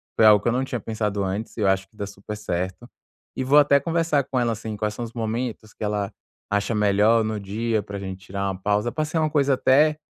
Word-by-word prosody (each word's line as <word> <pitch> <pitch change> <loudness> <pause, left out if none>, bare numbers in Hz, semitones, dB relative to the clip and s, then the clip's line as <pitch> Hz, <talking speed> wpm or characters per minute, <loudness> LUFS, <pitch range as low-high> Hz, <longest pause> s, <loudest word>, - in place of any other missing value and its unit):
foi 110 - +5
algo 105 -2 +7
que - - -3
eu 115 - +3
não 130 +2 +1
tinha 125 -2 -3
pensado 105 -2 -2
antes 100 +3 -3
e - - -5
eu 105 - +2
acho 95 0 +2
que 105 - -27
dá 100 - -4
super 100 +1 -8
certo, 95 +3 -4 0.5
e 130 - -2
vou 140 +3 +6
até 140 -1 +5
conversar 165 -2 +1
com 130 -1 -2
ela, 120 -1 +1
assim, 110 -1 -6
quais 105 0 -1
são 120 - -5
os 115 - -6
momentos 115 -1 -3
que - - -8
ela 105 -1 -1 0.4
acha 105 +2 0
melhor 105 +2 +3
no 110 -1 -3
dia 110 +2 -1
pra 100 0 -6
gente 95 -1 -7
tirar 100 +1 -3
uma 95 - -3
pausa 105 +3 +1
pra 155 +6 -2
ser 155 +2 -3
uma 155 -1 +2
coisa 140 -3 +2
até, 150 +4 +4
110 Hz, 250 wpm, -24 LUFS, 100-125 Hz, 0.5 s, algo